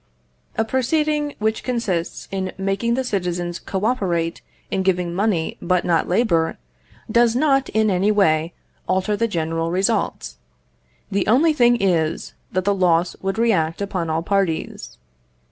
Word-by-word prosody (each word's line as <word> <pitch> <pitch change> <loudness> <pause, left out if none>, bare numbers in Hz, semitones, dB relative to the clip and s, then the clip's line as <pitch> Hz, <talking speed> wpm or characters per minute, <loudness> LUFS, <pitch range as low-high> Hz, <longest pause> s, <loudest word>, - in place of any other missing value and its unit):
A 220 - +2
proceeding 295 +4 0
which 220 +1 -1
consists 210 -9 -2
in 190 -1 -3
making 195 +5 0
the 260 - -1
citizens 175 -6 -2
co 195 +1 -3
operate 175 -9 0 0.3
in 190 - 0
giving 180 -2 0
money 190 -3 0
but 180 0 +1
not 170 -2 +2
labour, 175 -5 +1 0.5
does 235 0 +4
not, 270 -1 +2
in 220 -1 +2
any 190 +3 +2
way, 165 -5 +2 0.4
alter 190 +3 +1
the 230 +2 0
general 165 -3 -2
results. 180 - -1 0.7
The 195 -1 0
only 295 +8 +4
thing 240 -4 +4
is, 165 -5 0 0.2
that 185 0 -1
the 200 - +3
loss 175 -2 +2
would 195 +2 -2
react 185 -9 +1
upon 185 -4 -2
all 160 +1 -1
parties. 195 -3 -2
195 Hz, 145 wpm, -21 LUFS, 175-230 Hz, 0.7 s, does